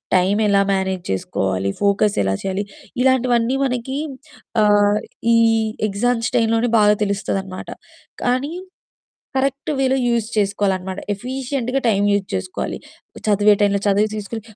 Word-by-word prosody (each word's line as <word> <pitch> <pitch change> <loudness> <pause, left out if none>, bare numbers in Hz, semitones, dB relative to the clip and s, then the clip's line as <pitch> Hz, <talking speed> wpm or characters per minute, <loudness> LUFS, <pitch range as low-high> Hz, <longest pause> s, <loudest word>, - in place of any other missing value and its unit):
Time 190 +3 +3
ఎలా 200 0 +4
manage 190 -2 -1
చేసుకోవాలి, 95 0 -1
focus 200 +1 +2
ఎలా 95 0 +1
చేయాలి 195 +1 -2 0.4
ఇలాంటివన్నీ 255 -1 +2
మనకి 250 +2 -2 0.7
ఆహ్, 205 0 +4 0.4
ఈ - - +5 0.5
ఎగ్జామ్స్ 230 +4 0
టైంలోనే 230 +1 +2
బాగా 210 0 +5
తెలుస్తదన్నమాట. 195 -1 -3 0.6
కానీ 255 +6 0 0.8
కరెక్ట్ 275 +2 -1
వేలో 265 0 +2
యూజ్ 235 -2 +1
చేసుకోవాలన్నమాట. 195 -2 0
ఎఫీషియంట్‌గా 255 +3 -3
టైమ్ 205 -2 +2
యూజ్ 200 -1 0
చేసుకోవాలి. 185 0 -3 0.5
చదివే 210 0 +4
టైమ్‌లో 200 -1 +3
చదువు 205 +2 +3
తీసుకొని 215 +2 -5
210 Hz, 115 wpm, -20 LUFS, 195-245 Hz, 0.8 s, ఈ